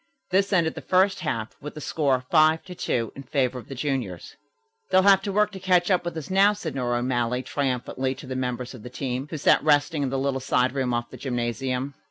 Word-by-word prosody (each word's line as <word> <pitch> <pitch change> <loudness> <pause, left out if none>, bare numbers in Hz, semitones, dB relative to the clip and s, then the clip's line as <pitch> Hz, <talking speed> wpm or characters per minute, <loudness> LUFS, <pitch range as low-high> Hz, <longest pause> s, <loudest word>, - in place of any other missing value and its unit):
This 195 +2 +2
ended 170 -4 +2
the - - -7
first 190 +1 +2
half, 115 -8 -3
with 150 - -8
the - - -6
score 135 -4 0
5 155 0 +4
to 185 - -9
2 115 -9 -2
in 135 - -7
favor 130 -2 -1
of - - -13
the 135 - -7
juniors. 125 - -3 0.5
"They'll 185 - +5
have 195 -1 +6
to 200 - -3
work 210 +1 +2
to 195 - -8
catch 180 0 +2
up 180 -1 +2
with 170 -1 -4
us 160 +2 -6
now," 200 +2 +5
said 180 -7 -5
Nora 120 -2 -1
O'Malley 125 0 0
triumphantly 130 -1 -2
to - - -11
the 130 0 -5
members 125 -1 -3
of 125 - -10
the 125 - -8
team, 130 +1 -4
who 160 - -4
sat 145 - +4
resting 145 +1 +3
in 135 - 0
the 135 - -2
little 135 0 0
side 130 -1 +1
room 130 -2 -1
off 120 0 -2
the - - -9
gymnasium. 125 +1 -2
135 Hz, 235 wpm, -25 LUFS, 125-170 Hz, 0.5 s, have